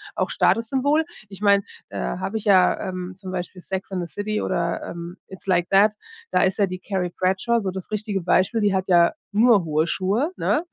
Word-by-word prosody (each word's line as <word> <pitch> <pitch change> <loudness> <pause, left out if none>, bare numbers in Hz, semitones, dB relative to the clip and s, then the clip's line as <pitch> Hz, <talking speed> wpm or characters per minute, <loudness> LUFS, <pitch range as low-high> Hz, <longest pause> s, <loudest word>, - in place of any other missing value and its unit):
auch - - -1
Statussymbol. 275 +7 +2 0.2
Ich 195 0 -12
meine, 200 -1 +4 0.3
äh - - -7
habe 60 - -3
ich 215 - -6
ja, 190 -3 +4
ähm 185 0 -5
zum 190 -2 -8
Beispiel 180 0 -5
„Sex 190 +1 -5
and 180 -3 -3
the - - -17
City“ 215 +1 -2
oder, 170 0 -1
ähm, 170 +2 -7
„It's 190 0 -12
like 175 -1 +2
that“. 205 +2 +5 0.4
Da - - +3
ist 190 -1 +1
ja 205 - +4
die 185 0 -6
Carrie 180 -2 -3
Bradshaw 190 +6 +1
so 190 -3 -2
das 190 +1 -8
richtige 210 -2 -2
Beispiel. 185 +6 +2
Die 205 -1 +2
hat 190 0 -1
ja 170 -2 +5 0.2
nur 220 -2 +5
hohe 155 +1 +1
Schuhe, 210 - 0
ne? 300 - +1
190 Hz, 205 wpm, -23 LUFS, 180-210 Hz, 0.4 s, that